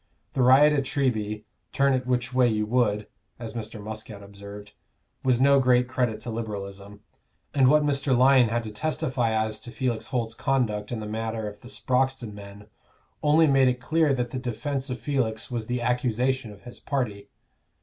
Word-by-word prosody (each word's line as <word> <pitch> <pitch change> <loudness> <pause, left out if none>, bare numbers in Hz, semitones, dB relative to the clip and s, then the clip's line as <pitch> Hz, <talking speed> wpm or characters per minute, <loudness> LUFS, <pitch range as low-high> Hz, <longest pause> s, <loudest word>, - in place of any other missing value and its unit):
The 130 - 0
riot 135 +4 +6
at 145 - +2
Treby, 110 -7 -1 0.3
"turn 140 0 +3
it 130 -1 -1
which 125 -1 -1
way 125 -1 +4
you 105 -2 0
would," 105 -3 +1 0.3
as 115 -2 -7
Mr. 110 -1 -6
Muscat 105 -1 -8
observed, 100 +1 -11 0.5
was 125 -2 +2
no 140 +1 +5
great 125 -1 +3
credit 125 -4 -1
to 120 - -5
Liberalism; 100 -2 -6 0.5
and 135 -2 +4
what 150 +3 +5
Mr. 140 -3 +1
Lyon 130 -2 +5
had 120 +1 -1
to 110 - -6
testify 130 -2 -1
as 110 0 -1
to - - -11
Felix 125 -2 -2
Holt's 115 -3 -2
conduct 115 -5 -1
in 115 -2 -3
the - - -5
matter 110 0 -3
of 105 0 -9
the 120 - -12
Sproxton 130 -4 -1
men, 100 0 -11 0.6
only 155 +2 +5
made 135 -3 +4
it 125 0 +1
clear 155 +3 +2
that 125 -3 -1
the 130 - -3
defence 130 +3 -3
of 125 -2 -4
Felix 120 -3 -2
was 115 -3 -3
the 125 0 -2
accusation 125 0 0
of 100 -1 -15
his 120 - -11
party. 120 -8 -3
120 Hz, 180 wpm, -26 LUFS, 110-130 Hz, 0.6 s, riot